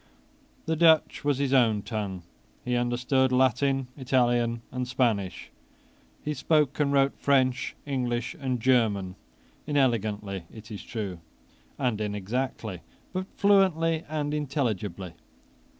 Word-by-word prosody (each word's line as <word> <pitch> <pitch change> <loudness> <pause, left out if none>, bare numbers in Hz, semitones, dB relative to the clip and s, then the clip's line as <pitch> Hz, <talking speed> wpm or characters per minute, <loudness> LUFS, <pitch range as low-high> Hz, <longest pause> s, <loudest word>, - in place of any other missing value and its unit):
The 160 +1 0
Dutch 160 -1 +4
was 145 -2 +1
his 140 -1 0
own 115 -6 +3
tongue. 100 -5 -4 0.4
He 125 0 0
understood 125 +2 +1
Latin, 130 +1 +2
Italian, 120 -3 +1
and 125 0 -3
Spanish. 115 -7 -1 0.7
He 150 - -1
spoke 150 0 +1
and 145 -1 +2
wrote 140 0 +2
French, 130 -3 +2
English, 125 -1 -2
and 130 -3 -1
German, 110 -7 +2 0.5
inelegantly, 110 - 0
it 110 0 -12
is 105 - -6
true, 100 -7 -5 0.6
and 120 -6 -1
inexactly, 105 -1 -3 0.3
but 185 +1 -3
fluently 170 -5 +3
and 150 -1 -2
intelligibly. 110 - -2
125 Hz, 115 wpm, -27 LUFS, 110-140 Hz, 0.7 s, Dutch